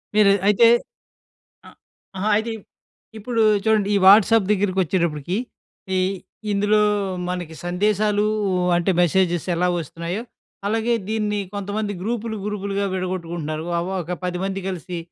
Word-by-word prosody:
మీరు 210 -2 +6 0.2
అయితే 210 +3 +6 1.0
అ - - -12 0.5
ఆహా! 200 +3 0
అయితే 220 +2 -1 0.7
ఇప్పుడు 230 +2 -2 0.2
చూడండి 215 -2 +2
ఈ - - +4
వాట్సాప్ 210 +1 +6
దగ్గరికొచ్చేటప్పటికి 185 -4 0 0.6
ఈ - - +2 0.5
ఇందులో 205 +1 +2 0.5
మనకి 175 -3 -4
సందేశాలూ 205 +3 +1 0.5
అంటే 175 +2 +1
మెసేజెస్ 175 -1 +2
ఎలా 180 +2 +1
వస్తున్నాయో, 170 +5 -5 0.4
అలాగే 225 +3 0 0.2
దీన్ని 210 -1 -1 0.2
కొంతమంది 205 +1 -3
గ్రూపులు 225 +1 -3
గ్రూపులుగా 200 -1 -2
విడగొట్టుకుంటున్నారు. 170 -4 -4
ఒ - - +1 0.2
ఒక 170 +2 -5
10 190 +2 -2
కలిసి 180 -1 -5
195 Hz, 110 wpm, -22 LUFS, 175-210 Hz, 1.0 s, మీరు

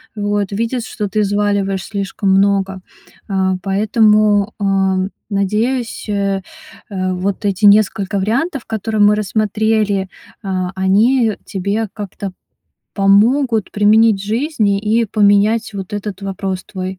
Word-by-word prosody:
Вот. 205 -1 -1
Видит, 230 +4 -2
что 210 - -4
ты 215 +2 0
взваливаешь 200 -2 0
слишком 200 -1 -3
много, 195 -1 +1 0.5
а. 190 -1 +1
Поэтому, 210 +1 +2
а, 195 -1 +1 0.3
надеюсь, 220 +6 -1
э, 200 -1 -1 0.5
э, 185 -2 -2
вот 190 +3 -3
эти 200 +1 +1
несколько 200 -1 +3
вариантов, 245 - -1
которые 220 0 -2
мы 205 0 +5
рассмотрели, 210 -1 0 0.3
а, 185 -2 -2
они 215 +5 +2
тебе 200 +3 -2
как-то 200 -1 -6 0.6
помогут 220 +3 +3
применить 210 0 +4
в - - -6
жизни 220 -4 0
и 220 +2 +1
поменять 210 +2 +2
вот 195 0 -7
этот 205 -1 -5
вопрос 195 -1 -4
твой. 185 -1 -6
205 Hz, 120 wpm, -17 LUFS, 195-220 Hz, 0.6 s, мы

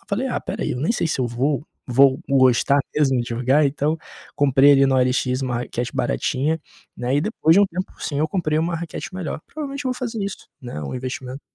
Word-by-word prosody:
eu - - -29
falei: 220 +6 -1
"Ah, 260 - -1
espera - - -5
aí, - - -1
eu 125 - -4
nem 155 - 0
sei 190 - 0
se 155 - -1
eu 125 - +1
vou 135 +5 -1 0.2
vou 135 +2 +4
gostar 135 +1 +4
mesmo 135 -4 +2
de 120 - -4
jogar," 130 +5 +2
então, 145 +3 0 0.4
comprei 140 0 +5
ali 135 -1 +5
no 135 - +2
OLX 130 0 +1
uma 125 -3 -1
raquete 120 0 -4
baratinha, 145 - 0 0.4
né? 125 +2 -1
E 145 - +3
depois 165 -3 +2
de 200 - +6
um 200 - +5
tempo 185 +1 -5
sim, 145 -2 -2
eu 155 - +2
comprei 155 -3 0
uma 165 +1 0
raquete 170 +2 -6
melhor. 180 -4 -4
Provavelmente 280 -2 -6
eu 255 - 0
vou - - -8
fazer 235 -3 -4
isso, 200 - -7
né? 120 - -6
Um 70 - -5
investimento. 130 +1 -6
140 Hz, 230 wpm, -22 LUFS, 130-165 Hz, 0.4 s, de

